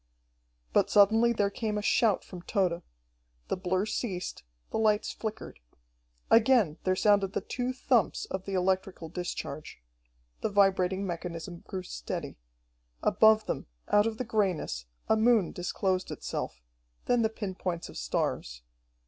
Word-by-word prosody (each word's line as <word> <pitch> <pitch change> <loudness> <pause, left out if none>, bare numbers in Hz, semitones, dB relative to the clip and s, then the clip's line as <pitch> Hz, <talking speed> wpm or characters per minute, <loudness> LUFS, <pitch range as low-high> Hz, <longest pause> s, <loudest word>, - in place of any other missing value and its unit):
But - - +3
suddenly 220 +3 +5
there 205 -3 +1
came 215 -1 -2
a 210 - -2
shout 215 -2 +3
from 180 -2 -9
Tode. 180 -2 0 0.7
The - - +1
blur 185 +1 0
ceased, 195 -5 -3 0.3
the - - -1
lights 215 -1 +2
flickered. 220 -1 -6 0.7
Again 225 - +5
there 185 0 +3
sounded 200 -1 +3
the - - -1
two 250 0 -2
thumps 250 -3 +1
of 190 0 -5
the 195 - -3
electrical 185 -2 0
discharge. 155 - -5 0.6
The - - 0
vibrating 195 -1 +3
mechanism 170 -1 -5
grew 185 -1 -4
steady. - - -5 0.6
Above 220 0 +5
them, - - -3 0.2
out 205 +1 +4
of 220 -1 -3
the 255 - -3
grayness, 185 - -1 0.2
a 220 - +4
moon 220 -4 +3
disclosed 185 +1 -1
itself, 60 - -5 0.4
then 245 -1 +3
the 220 - +2
pin 205 -3 -5
points 180 -2 -3
of - - -12
stars. - - -2
195 Hz, 140 wpm, -29 LUFS, 180-220 Hz, 0.7 s, suddenly